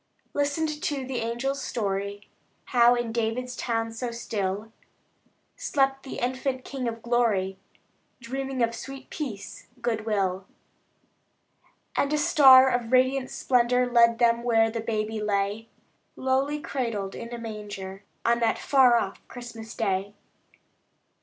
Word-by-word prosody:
Listened 295 +1 -1
to 275 -3 -2
the 260 -1 -4
angels' 240 +4 -2
story: 200 -2 -3 0.5
How, 240 0 +6
in 240 -1 -2
David's 235 +2 -2
town 225 -2 -1
so 235 +2 -4
still, 215 -2 -3 0.8
Slept 270 - 0
the 270 - -7
infant 255 +1 -2
King 265 -3 -4
of 230 -1 -5
Glory, 210 -6 +1 0.6
Dreaming 265 +1 -3
of 230 0 +1
sweet 270 +3 -9
peace, 235 -10 -6
good 230 -2 -2
will. 195 -3 0 1.5
And 280 - +1
a 300 - +2
star 275 -5 +8
of 245 -2 -1
radiant 260 +1 +3
splendor 250 0 +2
Led 235 -1 +5
them 235 -1 +3
where 225 -2 +3
the 230 0 -3
baby 220 -1 -2
lay, 205 +1 -1 0.5
Lowly 270 +3 0
cradled 230 -10 -3
in 235 0 -7
a 240 - -4
manger, 205 -4 -7 0.2
On 235 0 +3
that 230 -1 +2
far 260 -4 +5
off 195 -4 -3
Christmas 230 -2 -9
day. 200 -1 -1
235 Hz, 130 wpm, -26 LUFS, 220-260 Hz, 1.5 s, star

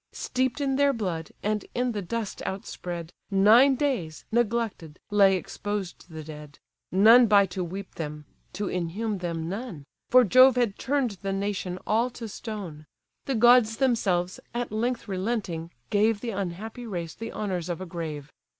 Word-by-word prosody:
Steep'd 255 +1 -1
in 270 -2 0
their 280 0 +4
blood, 180 - -3
and 210 0 -1
in 245 0 +1
the 210 -3 -3
dust 215 +3 -4
outspread, 175 -3 -5 0.2
Nine 220 +8 +6
days, 240 - -2
neglected, 225 -8 -1
lay 200 -2 +5
exposed 195 0 -5
the 160 -1 -8
dead; 150 -1 -10 0.3
None 225 +6 +7
by 200 -2 +6
to 185 0 -4
weep 190 +3 -7
them, 150 -2 -6 0.3
to 200 +2 -3
inhume 190 +5 -2
them 165 -2 -3
none; 195 - -5 0.3
(For 255 +1 +7
Jove 255 +4 +7
had 240 -5 0
turn'd 255 -8 -1
the 195 - -2
nation 195 -2 -2
all 230 +3 +2
to 230 - -5
stone.) 195 -9 -7 0.4
The 270 - -1
gods 235 -1 +5
themselves, 195 -9 +1 0.2
at 240 -2 -2
length 230 +2 -2
relenting 190 -4 -2 0.2
gave 210 +1 +2
The 235 - -3
unhappy 200 +5 -5
race 170 -6 -4
the 225 +1 -7
honours 180 -5 -3
of 175 - -3
a 185 - -5
grave. 155 -5 -6
205 Hz, 160 wpm, -26 LUFS, 175-235 Hz, 0.4 s, None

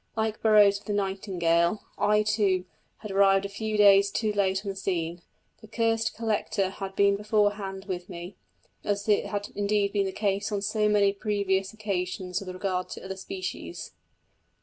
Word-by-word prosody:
Like 220 -1 -1
Burroughs 205 -2 +5
with - - -21
the 210 - -1
nightingale, 190 -2 0
I, 210 +1 +3
too, 205 -4 +1 0.4
had 210 - -5
arrived 195 0 +4
a - - -4
few 215 +1 -3
days 200 -1 +6
too 215 +1 -1
late 195 -1 0
on - - -2
the - - -9
scene; 175 -3 -2 0.4
the 220 - -13
"cursed 225 0 0
collector" 215 -3 -1
had 195 0 -7
been 200 0 +4
beforehand 205 -2 0
with 180 -2 -5
me, 175 +1 -8 0.5
as 205 0 -1
had 205 -1 0
indeed 205 0 0
been 200 -2 +1
the - - -3
case 200 +1 -1
on 200 -1 -2
so 210 +1 +1
many 200 -1 +3
previous 200 -2 -1
occasions 185 -3 -3
with 195 - -8
regard 185 0 -2
to - - -8
other 190 0 -5
species. 375 - -6
200 Hz, 170 wpm, -27 LUFS, 190-210 Hz, 0.5 s, days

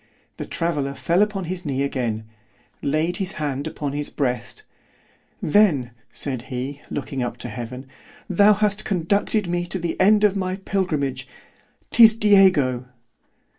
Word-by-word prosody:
——The - - -6
traveller 145 -5 -2
fell 170 +7 +1
upon 210 -2 0
his 180 +1 -5
knee 140 -2 -1
again—laid 120 - -4
his 195 0 -3
hand 145 -2 -3
upon 145 -2 -4
his 145 0 -1
breast—then, 140 - -2 0.2
said 130 -4 -3
he, 135 +3 -6
looking 135 -1 -4
up 120 -1 -3
to 125 - -6
heaven, 120 +3 -7 0.4
thou 200 +3 +5
hast 210 0 0
conducted 200 +3 0
me 175 0 -2
to 190 - -2
the 170 0 -3
end 210 +2 +5
of 205 -1 +4
my 185 -1 -2
pilgrimage—'Tis 185 - +1
_Diego. 185 - +4
155 Hz, 130 wpm, -22 LUFS, 130-195 Hz, 0.4 s, thou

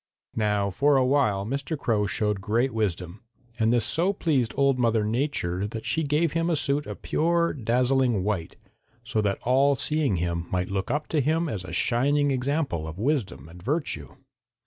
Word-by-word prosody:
"Now 105 -2 +1
for 140 +8 +3
a 130 - +3
while 125 -8 +2
Mr. 140 +6 -3
Crow 105 -6 0
showed 105 0 -1
great 115 +6 0
wisdom, 95 -3 -2 0.4
and 110 0 +3
this 120 -2 +2
so 180 +5 +2
pleased 140 - 0
Old 140 -2 +3
Mother 115 -3 +2
Nature 105 -6 -1
that 110 +1 -7
she 160 - 0
gave 150 +1 +1
him 165 +1 0
a 170 - +2
suit 145 0 -1
of - - -8
pure, 170 +1 +1
dazzling 125 -2 +1
white, 95 -5 -2 0.5
so 115 -3 -1
that 100 -2 0
all 135 +3 +3
seeing 150 -5 0
him 85 0 -2
might 90 0 -1
look 95 -1 -2
up 150 +4 -1
to 155 - +1
him 160 +4 +1
as 105 - -4
a 95 - -8
shining 145 +4 +2
example 130 - -1
of 80 +2 -7
wisdom 115 - -1
and 85 +2 -13
virtue. 145 - -3
120 Hz, 180 wpm, -26 LUFS, 100-145 Hz, 0.5 s, for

